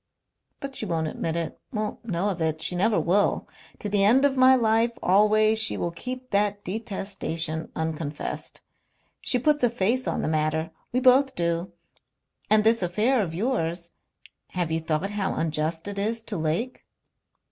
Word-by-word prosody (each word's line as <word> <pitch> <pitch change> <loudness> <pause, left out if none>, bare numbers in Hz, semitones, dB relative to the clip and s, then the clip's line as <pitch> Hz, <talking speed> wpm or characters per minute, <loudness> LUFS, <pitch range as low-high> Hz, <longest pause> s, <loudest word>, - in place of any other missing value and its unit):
But 275 -1 -6
she 220 - +1
won't 165 -2 -1
admit 160 +1 -3
it, 165 -1 -4
won't 215 -2 -4
know 195 -2 -1
of 180 -4 -4
it. 160 -1 0
She 180 - 0
never 210 +5 +2
will. 200 +4 +1 0.3
To - - -5
the 200 -1 +2
end 250 +7 +5
of 275 -1 +2
my 260 0 +6
life, 225 -1 +3
always, 215 +3 +4
she 210 - +3
will 170 - -2
keep 255 +7 -7
that 205 0 +1
detestation 185 -6 -3
unconfessed. 160 -2 -4 0.6
She 250 - +1
puts 295 +2 +1
a 245 - +5
face 235 +3 0
on - - -1
the - - -1
matter. 155 +1 0 0.2
We 255 - 0
both 260 +1 +5
do. 170 +1 -1 0.8
And 215 0 +5
this 225 0 +4
affair 215 +8 +2
of 165 -5 -3
yours.... 170 -6 -2 0.6
Have 175 -3 -1
you 160 - +1
thought 160 +4 -2
how 205 -2 -2
unjust 160 +2 -2
it 200 -1 -4
is 225 +3 -1
to 225 - -4
Lake?" 165 +11 -2
200 Hz, 170 wpm, -25 LUFS, 165-230 Hz, 0.8 s, my